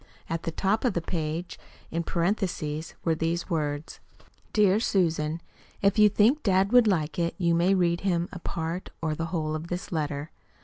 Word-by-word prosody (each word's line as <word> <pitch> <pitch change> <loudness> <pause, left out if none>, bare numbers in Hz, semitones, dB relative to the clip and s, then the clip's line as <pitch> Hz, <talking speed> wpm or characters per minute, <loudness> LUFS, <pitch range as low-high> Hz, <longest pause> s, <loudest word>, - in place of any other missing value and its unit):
At 165 0 -1
the 165 - -3
top 195 +6 0
of 250 - +2
the 170 - -1
page 165 0 -3 0.3
in 165 - -1
parentheses 170 -3 -2
were 165 - +3
these 165 +3 -2
words: 150 -1 -2 0.5
DEAR 205 -1 +4
SUSAN: 165 -6 0 0.4
If 200 +2 +3
you 210 0 +8
think 225 +9 +3
dad 195 -2 +2
would 245 -2 +6
like 165 -5 0
it 170 0 0
you 170 -3 +2
may 175 +3 +3
read 170 -2 +2
him 175 -3 0
a 180 - -7
part 165 +2 -4
or 160 -2 -1
the 165 +2 -3
whole 155 -3 -2
of 155 +2 -4
this 175 +2 -5
letter. 150 -1 -2
170 Hz, 180 wpm, -27 LUFS, 160-190 Hz, 0.5 s, you